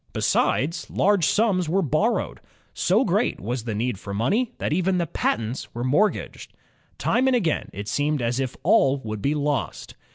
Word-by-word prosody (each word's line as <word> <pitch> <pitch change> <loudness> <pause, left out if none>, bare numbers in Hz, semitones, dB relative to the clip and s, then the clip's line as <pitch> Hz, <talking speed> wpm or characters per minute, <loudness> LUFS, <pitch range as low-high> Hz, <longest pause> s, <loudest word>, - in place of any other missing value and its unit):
Besides, 155 +6 0
large 200 -4 +2
sums 195 -7 +2
were 190 +3 +2
borrowed. 140 - 0 0.3
So - - +2
great - - 0
was 120 +3 -4
the 110 -3 -3
need 115 -1 -2
for 100 -1 -6
money 210 - +1
that - - -2
even 185 +2 +1
the 175 - 0
patents 115 -5 -2
were 120 - -3
mortgaged. 150 +12 0 0.4
Time 250 +3 +1
and 260 - +3
again 175 -10 0
it 100 +1 -7
seemed 145 +7 0
as 120 +1 -1
if 130 -1 -3
all 135 +1 +4
would 110 -2 -5
be 140 +7 0
lost. 145 -3 -2
145 Hz, 170 wpm, -24 LUFS, 120-185 Hz, 0.4 s, all